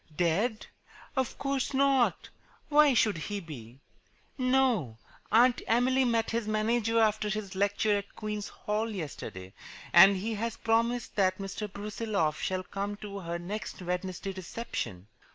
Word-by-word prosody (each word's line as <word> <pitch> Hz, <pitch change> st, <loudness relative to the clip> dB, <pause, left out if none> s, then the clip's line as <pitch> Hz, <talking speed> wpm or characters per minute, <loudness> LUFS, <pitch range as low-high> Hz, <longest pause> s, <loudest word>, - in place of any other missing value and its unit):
"Dead? 195 Hz, +7 st, +1 dB, 0.5 s
Of 265 Hz, -2 st, -1 dB
course 275 Hz, 0 st, -1 dB
not. 270 Hz, -2 st, +2 dB, 0.4 s
Why 295 Hz, -3 st, +6 dB
should 215 Hz, -6 st, +3 dB
he 205 Hz, +5 st, -4 dB
be? 135 Hz, -, -10 dB, 0.5 s
No, 255 Hz, -, +1 dB, 0.3 s
Aunt 245 Hz, +2 st, +5 dB
Emily 255 Hz, +3 st, +3 dB
met 230 Hz, -2 st, +1 dB
his 230 Hz, -1 st, -1 dB
manager 225 Hz, +1 st, +1 dB
after 215 Hz, -1 st, +2 dB
his 210 Hz, -2 st, -3 dB
lecture 205 Hz, +2 st, +1 dB
at 200 Hz, -, -12 dB
Queen's 210 Hz, -1 st, -4 dB
Hall 215 Hz, +2 st, -2 dB
yesterday, 140 Hz, -, -6 dB, 0.4 s
and 190 Hz, +3 st, +8 dB
he 220 Hz, +4 st, -2 dB
has 230 Hz, +2 st, -3 dB
promised 230 Hz, +1 st, 0 dB
that 185 Hz, -2 st, +3 dB
Mr. 200 Hz, +1 st, -5 dB
Brusiloff 200 Hz, -6 st, -2 dB
shall 185 Hz, 0 st, -1 dB
come 200 Hz, +2 st, -4 dB
to 205 Hz, -1 st, -7 dB
her 170 Hz, -2 st, -4 dB
next 195 Hz, +5 st, -6 dB
Wednesday 180 Hz, +2 st, -3 dB
reception." 185 Hz, -, -5 dB
210 Hz, 135 wpm, -29 LUFS, 185-230 Hz, 0.5 s, and